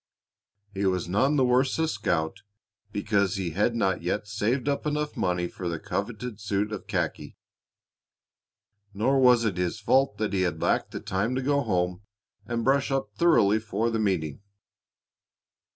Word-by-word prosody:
He 100 Hz, 0 st, -3 dB
was 90 Hz, -2 st, 0 dB
none 130 Hz, +11 st, +2 dB
the 135 Hz, -3 st, +3 dB
worse 130 Hz, +2 st, +2 dB
a 160 Hz, 0 st, +1 dB
scout 80 Hz, -, -1 dB, 0.5 s
because 100 Hz, -1 st, +1 dB
he 95 Hz, -4 st, -2 dB
had 105 Hz, +7 st, +1 dB
not 95 Hz, -6 st, +1 dB
yet 95 Hz, +4 st, -2 dB
saved 110 Hz, +6 st, -1 dB
up 145 Hz, +1 st, 0 dB
enough 150 Hz, 0 st, -2 dB
money 90 Hz, -1 st, 0 dB
for 90 Hz, 0 st, -5 dB
that 85 Hz, -2 st, -5 dB
coveted 110 Hz, +1 st, -4 dB
suit 100 Hz, +1 st, -1 dB
of 105 Hz, -, -6 dB
khaki. -, -, -3 dB, 1.6 s
Nor 130 Hz, +7 st, +2 dB
was 125 Hz, -3 st, +5 dB
it 100 Hz, -5 st, -1 dB
his 90 Hz, +4 st, -1 dB
fault 130 Hz, +1 st, +2 dB
that 105 Hz, 0 st, -2 dB
he 95 Hz, -, +1 dB
had 90 Hz, -2 st, -1 dB
lacked -, -, +1 dB
the -, -, -6 dB
time 100 Hz, +7 st, -1 dB
to 130 Hz, -, -1 dB
go 140 Hz, +1 st, +2 dB
home 90 Hz, -5 st, -1 dB, 0.5 s
and 115 Hz, 0 st, -2 dB
brush 135 Hz, +3 st, +2 dB
up 135 Hz, -1 st, -2 dB
thoroughly 110 Hz, -11 st, +4 dB
for 110 Hz, +1 st, -1 dB
the 115 Hz, -, -1 dB
meeting. 90 Hz, -7 st, -1 dB
105 Hz, 165 wpm, -27 LUFS, 95-130 Hz, 1.6 s, was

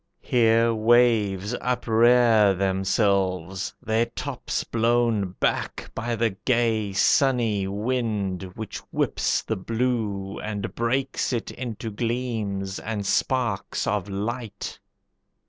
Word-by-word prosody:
Here 115 Hz, -2 st, +3 dB
waves 110 Hz, -3 st, +3 dB
uprear 115 Hz, -3 st, +4 dB
themselves, 95 Hz, -1 st, 0 dB
their 115 Hz, 0 st, +1 dB
tops 125 Hz, +2 st, -4 dB
blown 115 Hz, -4 st, +1 dB
back -, -, -1 dB
By 120 Hz, +1 st, -2 dB
the 115 Hz, 0 st, +1 dB
gay, 110 Hz, 0 st, 0 dB
sunny 110 Hz, -1 st, +2 dB
wind, 105 Hz, -3 st, -1 dB
which 110 Hz, -2 st, -6 dB
whips -, -, 0 dB
the 110 Hz, -, -2 dB
blue 110 Hz, -2 st, -2 dB
And 105 Hz, -2 st, -4 dB
breaks 130 Hz, +5 st, -1 dB
it 120 Hz, -3 st, -2 dB
into 115 Hz, -3 st, -5 dB
gleams 110 Hz, -4 st, -2 dB
and 105 Hz, -2 st, -4 dB
sparks 120 Hz, -1 st, 0 dB
of 105 Hz, -1 st, -1 dB
light. 110 Hz, +2 st, -4 dB
110 Hz, 100 wpm, -25 LUFS, 100-120 Hz, -, uprear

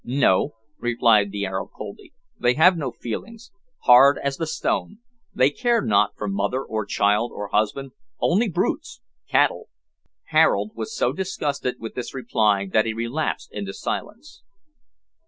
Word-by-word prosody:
"No," 130 Hz, -1 st, +2 dB, 0.2 s
replied 115 Hz, -4 st, +3 dB
the 100 Hz, 0 st, -3 dB
Arab 95 Hz, 0 st, -4 dB
coldly. 105 Hz, -1 st, -9 dB, 0.3 s
"They 125 Hz, 0 st, +2 dB
have 175 Hz, +4 st, +6 dB
no 145 Hz, -6 st, -3 dB
feelings. 225 Hz, -, -7 dB, 0.3 s
Hard 135 Hz, +3 st, +7 dB
as 140 Hz, -1 st, -3 dB
the 165 Hz, -, -3 dB
stone. 205 Hz, +5 st, -2 dB, 0.4 s
They 130 Hz, -3 st, +4 dB
care 240 Hz, -, +1 dB
not 105 Hz, -, +2 dB
for 105 Hz, -, -4 dB
mother, 100 Hz, +7 st, -1 dB
or 110 Hz, -4 st, -4 dB
child, 105 Hz, +4 st, +1 dB
or 105 Hz, -1 st, -6 dB
husband. 130 Hz, +6 st, -1 dB, 0.3 s
Only 210 Hz, +6 st, +2 dB
brutes 195 Hz, -, -2 dB, 0.3 s
cattle." -, -, +2 dB, 0.6 s
Harold 110 Hz, -10 st, +3 dB
was 110 Hz, -1 st, -6 dB
so 125 Hz, -, +1 dB
disgusted 150 Hz, -8 st, -2 dB
with 115 Hz, -2 st, -7 dB
this 125 Hz, 0 st, -6 dB
reply 105 Hz, -6 st, +1 dB
that 110 Hz, +1 st, +3 dB
he 110 Hz, -, -1 dB
relapsed 120 Hz, +7 st, -3 dB
into 100 Hz, -2 st, -5 dB
silence. 150 Hz, -, -6 dB
120 Hz, 145 wpm, -23 LUFS, 105-150 Hz, 0.6 s, Hard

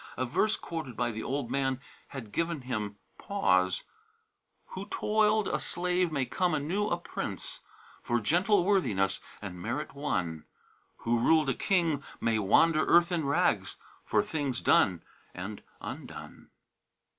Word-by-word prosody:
A 130 Hz, -, 0 dB
verse 215 Hz, -, +1 dB
quoted 155 Hz, -8 st, -6 dB
by 120 Hz, -1 st, 0 dB
the 110 Hz, 0 st, -5 dB
old 135 Hz, -2 st, -3 dB
man 135 Hz, -1 st, 0 dB, 0.3 s
had 120 Hz, -7 st, -8 dB
given 165 Hz, 0 st, -1 dB
him 110 Hz, -5 st, -3 dB, 0.2 s
pause: 95 Hz, -, +2 dB, 0.9 s
"Who 190 Hz, +2 st, -6 dB
toiled 215 Hz, 0 st, +2 dB
a -, -, 0 dB
slave 180 Hz, -1 st, 0 dB
may 140 Hz, -4 st, 0 dB
come 180 Hz, +3 st, +1 dB
anew 175 Hz, +8 st, 0 dB
a 170 Hz, -, 0 dB
prince 175 Hz, -, -5 dB, 0.4 s
For 120 Hz, 0 st, 0 dB
gentle 175 Hz, -, +3 dB
worthiness 110 Hz, -, +2 dB, 0.2 s
and 90 Hz, -3 st, -6 dB
merit 125 Hz, +9 st, -3 dB
won; 90 Hz, -, -2 dB, 0.6 s
Who 115 Hz, 0 st, +2 dB
ruled 155 Hz, +3 st, +4 dB
a -, -, +2 dB
king 170 Hz, -7 st, +1 dB, 0.2 s
may 115 Hz, -1 st, +1 dB
wander 155 Hz, +11 st, +4 dB
earth 170 Hz, +1 st, +5 dB
in 165 Hz, -4 st, 0 dB
rags 140 Hz, -, +1 dB, 0.3 s
For -, -, +2 dB
things 140 Hz, -5 st, -2 dB
done 90 Hz, -4 st, +3 dB, 0.3 s
and 100 Hz, +4 st, -6 dB, 0.2 s
undone." -, -, -8 dB
140 Hz, 140 wpm, -30 LUFS, 115-175 Hz, 0.9 s, earth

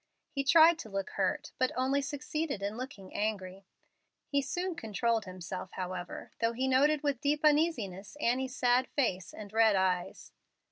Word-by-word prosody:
He 275 Hz, -3 st, -1 dB
tried 325 Hz, +3 st, +6 dB
to 220 Hz, -, -7 dB
look 195 Hz, -1 st, -3 dB
hurt, 290 Hz, +10 st, -1 dB
but 255 Hz, -1 st, +2 dB
only 265 Hz, +2 st, +1 dB
succeeded 290 Hz, -4 st, -3 dB
in 200 Hz, +2 st, -2 dB
looking 230 Hz, -6 st, -8 dB
angry. 195 Hz, -2 st, -3 dB, 0.6 s
He 280 Hz, -1 st, +1 dB
soon 355 Hz, +6 st, -2 dB
controlled 225 Hz, -, -1 dB
himself, 185 Hz, 0 st, -7 dB
however, 185 Hz, -1 st, -5 dB
though 230 Hz, 0 st, +1 dB
he 260 Hz, +3 st, -1 dB
noted 285 Hz, +3 st, +3 dB
with 285 Hz, -4 st, 0 dB
deep 295 Hz, +1 st, +1 dB
uneasiness 260 Hz, -, +1 dB
Annie's 260 Hz, 0 st, 0 dB
sad 250 Hz, +1 st, +3 dB
face 190 Hz, -, -1 dB
and 210 Hz, -1 st, -10 dB
red 220 Hz, -2 st, +5 dB
eyes. 185 Hz, -2 st, -1 dB
245 Hz, 155 wpm, -31 LUFS, 195-285 Hz, 0.6 s, tried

